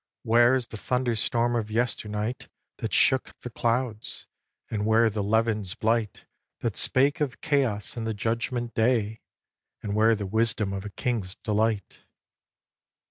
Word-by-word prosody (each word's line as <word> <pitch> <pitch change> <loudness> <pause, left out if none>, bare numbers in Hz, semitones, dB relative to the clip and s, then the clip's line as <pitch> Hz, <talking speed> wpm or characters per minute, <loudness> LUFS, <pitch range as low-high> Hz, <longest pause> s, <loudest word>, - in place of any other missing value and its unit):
Where 120 +3 +5
is 130 -2 0
the 110 - -8
thunderstorm 120 0 0
of 110 -2 -1
yesternight 110 0 -2 0.3
That - - -4
shook 130 -1 +2
the 125 - -7
clouds? 115 -2 -2 0.4
And 105 -2 -2
where 110 0 +4
the 105 0 -2
levin's 105 -2 0
blight 110 -2 -1 0.4
That - - -1
spake 140 +3 +2
of 135 -5 -1
chaos 135 -9 0
and 115 -1 -3
the 110 - -2
Judgment 115 +3 -2
Day? 110 -2 +1 0.6
And 100 - -3
where 110 +2 +4
the 105 -1 -4
wisdom 110 0 0
of 95 +1 -5
a - - -4
king's 100 -4 -3
delight? 105 -1 -1
115 Hz, 140 wpm, -26 LUFS, 105-120 Hz, 0.6 s, Where